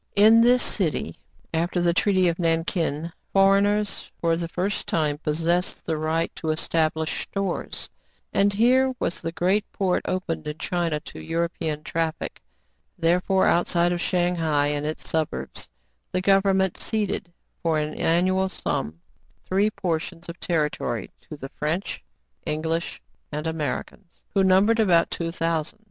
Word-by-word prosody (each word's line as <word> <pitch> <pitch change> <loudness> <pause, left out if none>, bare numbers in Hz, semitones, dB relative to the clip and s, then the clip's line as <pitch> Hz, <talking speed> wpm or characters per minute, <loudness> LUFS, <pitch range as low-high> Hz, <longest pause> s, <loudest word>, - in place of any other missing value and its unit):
In 220 +3 +7
this 245 +1 +5
city, 155 - -1 0.3
after 170 +2 0
the 175 -1 +3
treaty 185 0 +3
of 170 0 0
Nankin, 165 -1 0 0.2
for 195 0 +5
eigners 205 0 0
for 165 -1 +2
the 170 0 -3
first 185 +4 -2
time 150 -3 0
possessed 165 +4 0
the 160 - 0
right 160 +2 -1
to 160 - -3
establish 160 0 0
stores, 195 -3 -3 0.5
and 200 +1 +3
here 255 +5 +3
was - - -2
the 165 - -3
great 185 +5 +1
port 185 -2 0
opened 165 -4 -2
in 150 +1 -4
China 170 -2 -1
to - - -10
European 165 -2 -2
traffic: 160 0 -3 0.6
therefore, 180 +3 +2
outside 175 0 +3
of 175 - -2
Shang 180 0 +1
hai 150 -3 +2
and 145 0 -1
its 155 - -5
suburbs, 150 - -2 0.4
the 185 - 0
govern 195 0 +4
ment 190 -2 +1
ceded, 205 -4 -2 0.3
for 165 -2 +1
an 150 0 -1
annual 185 +3 +2
sum, 80 - -3 0.4
three 200 +3 +2
portions 175 -3 -3
of 170 +1 -8
territory 150 - -1 0.2
to 155 - -7
the 135 -1 -7
French, 160 +8 -3 0.4
English, 160 +2 -2 0.3
and 150 +1 -3
Americans, 160 +1 -4
who 195 - +3
number 190 +4 +5
about 175 -6 +4
two 165 -1 -2
thousand. 165 +3 -1
170 Hz, 145 wpm, -25 LUFS, 160-190 Hz, 0.6 s, In